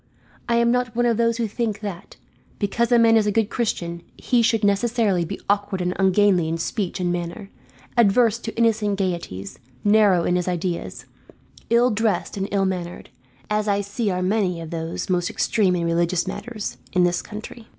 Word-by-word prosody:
I 235 - +3
am 235 0 +3
not 245 -2 0
one 240 0 +2
of 235 -2 +2
those 230 0 +2
who 230 -2 -1
think 215 -1 -3
that, 200 -4 -7 0.4
because 235 +4 0
a 240 - +6
man 230 -1 +5
is 215 -1 +2
a - - +2
good 220 +1 0
Christian, 170 -7 -2 0.2
he 245 -2 +1
should 225 -2 +2
necessarily 205 -3 +2
be 195 +4 -6
awkward 200 -1 0
and 180 0 -1
ungainly 190 -2 +3
in 165 +1 -1
speech 190 +2 -3
and 175 -1 0
manner, 175 +3 -5 0.4
adverse 230 0 +4
to 225 -1 -7
innocent 220 -3 +2
gaieties, 170 - -4 0.2
narrow 205 -4 +4
in 180 - +1
his 180 - -2
ideas, 175 -1 -3 0.6
ill 240 +2 +4
dressed 210 -3 0
and 195 -1 -2
ill 195 -1 +1
mannered, 180 -2 -4 0.4
as 210 0 -1
I 200 0 +2
see 205 +2 -2
are 180 -1 -1
many 185 -3 0
of 165 -1 -8
those 165 0 -4
most 180 -1 0
extreme 195 -5 +1
in 170 -1 -1
religious 170 +1 +1
matters, 215 0 -5 0.2
in 180 -1 +3
this 175 0 +1
country." 220 +2 -9
200 Hz, 185 wpm, -23 LUFS, 180-225 Hz, 0.6 s, a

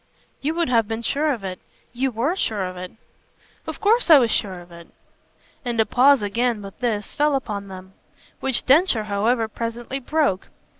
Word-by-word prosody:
You 305 +4 -1
would 340 -1 0
have 230 -4 +2
been 225 +1 -4
sure 295 +5 0
of 235 -7 -4
it. 185 -1 -5 0.3
You 260 +2 0
WERE 255 +9 -1
sure 215 - -1
of 185 0 -6
it." 180 0 -7 0.8
"Of - - -6
course 435 +1 +2
I 315 - +10
was 240 -4 +2
sure 190 -3 -1
of 175 0 -15
it." 170 0 -12 0.8
And 240 -3 -3
a 220 - +4
pause 265 0 +4
again, 230 +1 -1
with 195 -1 -11
this, 220 -5 -1
fell 295 -1 +2
upon 205 -7 -4
them; 190 0 -11 0.5
which 265 -2 +1
Densher, 275 - +4
however, 220 +3 0
presently 235 +4 -5
broke. 280 -8 0
230 Hz, 185 wpm, -22 LUFS, 200-270 Hz, 0.8 s, I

